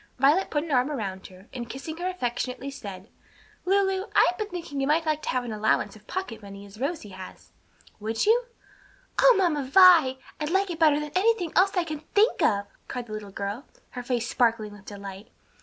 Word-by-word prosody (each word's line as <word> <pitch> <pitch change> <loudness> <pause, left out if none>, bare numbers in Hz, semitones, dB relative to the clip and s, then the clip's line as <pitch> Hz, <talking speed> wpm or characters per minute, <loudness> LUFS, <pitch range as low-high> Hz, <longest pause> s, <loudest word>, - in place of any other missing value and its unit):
Violet 290 +9 +3
put 295 -1 0
an 330 - -6
arm 255 +1 +3
around 195 -9 -4
her, 185 +1 -16
and 235 -2 -6
kissing 295 +6 -6
her 355 +1 -2
affectionately, 255 -4 -3
said, 200 -7 -9 0.6
"Lulu, 385 0 +2
I - - +7
have 360 - -12
been 425 -1 -3
thinking 330 -6 -5
you 270 - 0
might 320 +3 +2
like 310 -1 0
to - - -5
have 255 -1 0
an 235 -2 -5
allowance 215 +1 +1
of 210 -1 -18
pocket 375 -13 -5
money, 200 0 -10
as 200 +2 -14
Rosie 275 -4 -3
has. 185 -1 -11 0.5
Would 220 +1 -1
you?" 470 +3 +4 0.8
"O - - +7
Mamma 340 -6 +2
Vi! 320 -2 +6 0.2
I'd 300 0 -2
like 385 +1 +1
it 335 - -6
better 305 -3 +5
than 300 -1 -5
anything 375 -3 +1
else 390 +2 +3
I 355 - +3
can 310 -3 -5 0.2
think 425 +3 +4
of!" 200 -2 +2 0.2
cried 245 -2 -5
the 215 - -9
little 210 -1 -6
girl, 200 +6 -5 0.2
her 250 - -6
face 240 -1 -2
sparkling 230 -4 +1
with 205 -1 -15
delight. 200 0 -9
270 Hz, 205 wpm, -26 LUFS, 215-350 Hz, 0.8 s, I